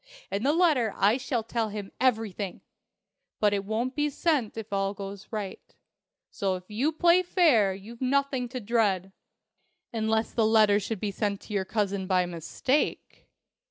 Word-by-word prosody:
In 200 - -1
the 275 +5 +3
letter 300 - +2
I 210 +5 +4
shall 255 -3 -2
tell 225 0 -2
him 205 -1 -6
everything. 220 -6 0 0.8
But 210 -1 +3
it 200 -1 0
won't 225 +5 -2
be 295 0 +1
sent 285 -7 0
if 220 -2 -6
all 195 0 0
goes 195 0 -8
right. 210 -4 -6 0.6
So 195 -2 -1
if 180 - -8
you 260 +9 +1
play 345 +3 +4
fair 290 - +3
you've 225 +5 -11
nothing 265 -1 0
to 255 +1 -5
dread." 200 -5 +1 0.8
"Unless 220 0 0
the 225 -2 +3
letter 215 -2 +5
should 215 0 -4
be 205 - -1
sent 200 0 -2
to 210 - -9
your 195 -2 0
cousin 200 -2 -1
by 185 -1 +3
mistake." 175 - -2
220 Hz, 160 wpm, -27 LUFS, 200-255 Hz, 0.8 s, letter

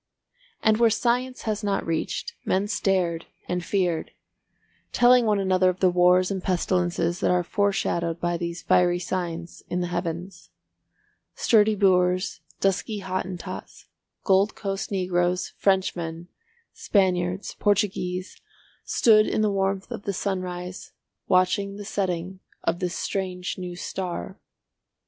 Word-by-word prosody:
And 220 -1 +4
where 230 0 +5
science 250 +3 0
has 215 -1 -2
not 200 -1 0
reached, 165 -1 -2
men 195 +2 +1
stared 180 -5 0 0.2
and 180 0 -2
feared, 175 -4 0 0.8
telling 245 -1 +5
one 210 -1 +3
another 185 -1 +3
of 185 0 -3
the 185 -1 +4
wars 180 +1 +4
and 190 -1 -2
pestilences 175 -1 0
that - - +1
are 180 0 +2
foreshadowed 170 -4 0
by 175 0 0
these 170 0 -4
fiery 175 -1 +3
signs 175 -1 -4
in 180 - -1
the 175 - -2
Heavens. 175 +1 -4 0.9
Sturdy 215 -1 +4
Boers, 185 -2 +2 0.2
dusky 195 +2 0
Hottentots, 185 -1 -5 0.4
Gold 195 +1 +3
Coast 195 -1 -3
Negroes, 180 -2 0
Frenchmen, 175 -3 0 0.4
Spaniards, 185 -1 0
Portuguese, 190 -3 0 0.4
stood 215 -2 +4
in - - 0
the 210 - +2
warmth 195 0 -1
of - - -6
the 200 - -1
sunrise 185 -1 -4 0.3
watching 195 +2 +2
the 205 0 -8
setting 185 -2 -2 0.2
of 175 - 0
this 180 -1 -2
strange 185 -2 -3
new 180 -1 -5
star. 185 +2 -5
185 Hz, 125 wpm, -25 LUFS, 175-200 Hz, 0.9 s, where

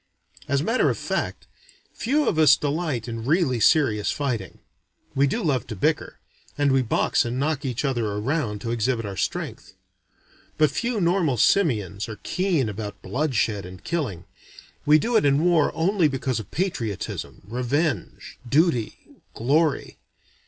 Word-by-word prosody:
As 140 0 +1
a - - -2
matter 230 +8 +2
of - - -1
fact, - - -3 0.5
few 290 +5 0
of 160 - +1
us 150 -3 +7
delight 145 -5 -2
in 115 -1 -5
really 140 -2 +2
serious 110 -4 +3
fighting. 120 -10 -3 0.6
We 140 +1 +3
do 225 - -2
love 135 -8 0
to 115 - -5
bicker; 95 - -1 0.4
and 145 -1 +2
we 135 0 +4
box 120 - +1
and 120 +1 -3
knock 150 +1 -1
each 125 +2 -2
other 120 -5 0
around, 105 +1 -2
to 115 - -3
exhibit 115 0 0
our 100 -1 -5
strength; - - -4 0.8
but 155 -1 +4
few 240 -2 -1
normal 170 -7 +2
simians 105 - +2
are 110 - -7
keen 180 - 0
about 105 -1 -6
bloodshed 120 -7 0
and 90 0 -11
killing; 115 - -3 0.6
we 150 +1 +7
do 235 +10 -1
it 220 - +5
in 140 +2 +3
war 175 -4 +3
only 175 +1 +2
because 135 -3 -2
of 105 - -8
patriotism, 135 - -3
revenge, 125 - -2
duty, 145 -5 +2 0.4
glory. 145 +5 +1
135 Hz, 150 wpm, -24 LUFS, 115-160 Hz, 0.8 s, us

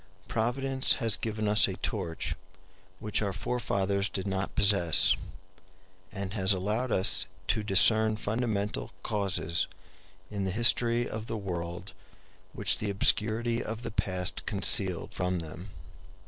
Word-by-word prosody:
Providence 130 +4 +1
has 115 -4 +2
given 110 +2 -3
us 105 +1 +6
a 95 - -4
torch 90 -7 -3 0.7
which 105 0 -1
our 100 -2 -1
forefathers 100 -2 -1
did 95 - -4
not 95 -1 -2
possess, 100 -6 +4 1.0
and 100 -1 -5
has 100 -2 +2
allowed 105 +7 -1
us 95 - 0 0.2
to 110 - +3
discern 110 +2 +4
fundamental 105 - -2
causes 100 -5 -1 0.6
in 100 -2 -3
the 95 - -1
history 120 +3 +4
of 110 0 -6
the 115 - -3
world 90 -1 -5 0.6
which 100 0 0
the 105 - -2
obscurity 110 +4 +2
of 110 +2 -6
the 115 - -4
past 90 -3 -2
concealed - - 0
from 90 0 -1
them. 85 +4 -7
105 Hz, 130 wpm, -29 LUFS, 95-110 Hz, 1.0 s, us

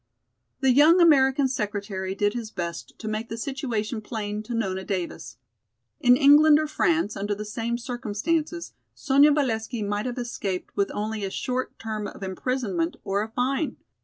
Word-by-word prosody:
The 265 -1 +4
young 305 +7 +6
American 275 -5 +5
secretary 200 -5 -3
did 205 +1 +1
his 235 -3 -5
best 170 -4 -6
to 220 - -7
make 215 +2 -3
the 225 - -5
situation 235 -4 -3
plain 210 -1 -4
to 230 +2 -5
Nona 190 -4 -2
Davis. 170 - -4 0.6
In 245 0 +5
England 295 +2 +7
or 310 - +1
France, 310 -6 +1
under 205 +1 -2
the 210 +1 -6
same 230 +2 -2
circumstances, 260 +8 -2 0.2
Sonya 285 +2 +5
Valesky 235 -5 -1
might 205 +3 -2
have 250 0 -4
escaped 205 -6 -4
with 200 - +1
only 215 0 -3
a 195 - -1
short 255 +6 -3
term 215 -2 -4
of 195 - -9
imprisonment 190 -3 -2
or 200 +1 0
a 215 - -3
fine. 265 +6 -1
225 Hz, 160 wpm, -25 LUFS, 205-265 Hz, 0.6 s, England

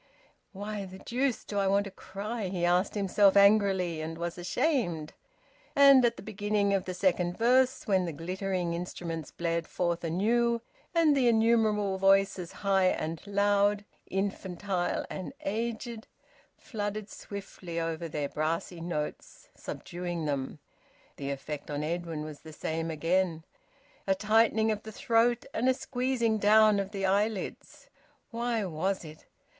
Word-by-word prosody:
"Why 205 0 -5
the 190 0 -10
deuce 250 +5 -1
do 205 - -2
I 195 - +2
want 200 +1 +3
to 200 - -8
cry?" 200 +3 -5
he 180 -2 -1
asked 180 +4 +2
himself 200 0 +4
angrily, 195 -5 +4
and 160 +1 -5
was 170 0 -3
ashamed. 175 - 0 0.6
And 275 -2 +8
at 240 - +2
the - - -9
beginning 205 -1 0
of 195 -2 0
the 185 - -4
second 180 -1 +1
verse, 255 +3 +3
when 190 -5 +2
the 170 - -3
glittering 180 +2 -2
instruments 170 -3 -5
blared 170 -1 -2
forth 175 -1 -1
anew, 230 +7 +1 0.3
and 320 -3 +5
the 260 -3 +3
innumerable 220 -4 +3
voices, 195 -2 +3
high 195 -2 +1
and 165 -3 -1
loud, 205 0 +2 0.2
infantile 190 -1 -2
and 190 +7 -6
aged, 230 +2 -3 0.5
flooded 205 -2 -4
swiftly 195 -5 -7
over 165 0 -3
their 150 -2 -2
brassy 165 +3 -2
notes, 160 -3 -5
subduing 175 -2 -5
them, 140 -1 -2 0.6
the 140 -1 -4
effect 140 +2 -5
on 145 0 -2
Edwin 165 -1 -3
was 155 -1 -8
the 160 - -12
same 160 +2 -3
again: 165 +1 0 0.6
a 195 - +3
tightening 220 +1 +3
of 210 -1 -2
the 220 - -9
throat, 230 +2 +2
and 250 +3 +2
a 260 - +3
squeezing 245 -4 0
down 215 0 +5
of 195 -1 -2
the 195 -2 -3
eyelids. 200 +2 -1 0.4
Why 235 -2 -1
was 185 +2 -2
it? 155 0 -12
195 Hz, 145 wpm, -29 LUFS, 170-220 Hz, 0.6 s, And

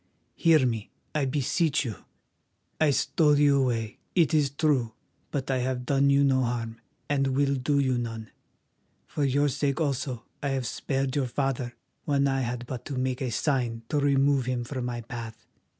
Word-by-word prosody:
Hear 160 -5 +4
me, 115 -4 -2 0.2
I 150 -3 +1
beseech 145 +3 +1
you. 115 - -3 0.9
I 155 - +4
stole 150 +1 +3
you 140 -1 +4
away, 115 -4 -1 0.2
it 170 -2 +3
is 150 -3 +3
true, 135 -5 +1 0.4
but 135 -1 -2
I 130 - +1
have 125 0 -2
done 140 +1 +3
you 140 0 +4
no 135 -1 +3
harm, 115 -2 -3 0.3
and 135 -1 +1
will 140 0 +2
do 140 +2 0
you 130 -3 +2
none. 115 -2 -5 0.7
For 145 - -3
your 140 +2 +2
sake 140 0 -1
also 135 -5 -2 0.2
I 145 - -1
have 130 - -3
spared 135 +2 -2
your 140 -3 +1
father 125 -1 -2 0.3
when 140 -1 +2
I 135 -1 +1
had 120 -1 -3
but 125 -1 -6
to 135 - -4
make 130 +1 -1
a 130 - -1
sign 120 -2 -1
to 150 - +1
remove 140 -2 +3
him 125 -1 -1
from 125 0 -4
my 120 -1 -3
path. 115 -1 -8
135 Hz, 180 wpm, -27 LUFS, 120-140 Hz, 0.9 s, Hear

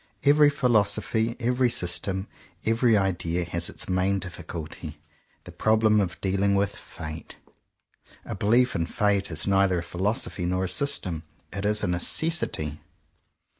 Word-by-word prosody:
Every 145 +1 +6
phil 140 -4 0
osophy, 110 +2 +1
every 125 +1 +2
system, 95 0 -1 0.4
every 115 0 +3
idea, 90 -3 0
has, 85 0 -1
as - - 0
its - - -2
main 95 +1 +1
difficulty, 85 -4 -7 0.4
the - - -11
problem 110 -1 +3
of 90 -2 -3
dealing 100 +1 +1
with 100 0 0
Fate. 80 +1 -8 0.9
A - - -5
belief 120 +4 +3
in 85 -1 0
Fate 100 0 +1
is 80 -2 -2
neither 95 -2 +3
a 85 - -2
philosophy 95 +1 -2
nor 90 +1 0
a - - -1
system; 95 - -1 0.3
it 100 +1 -2
is 105 0 0
a - - +1
necessity. 90 - 0
100 Hz, 145 wpm, -26 LUFS, 90-110 Hz, 0.9 s, Every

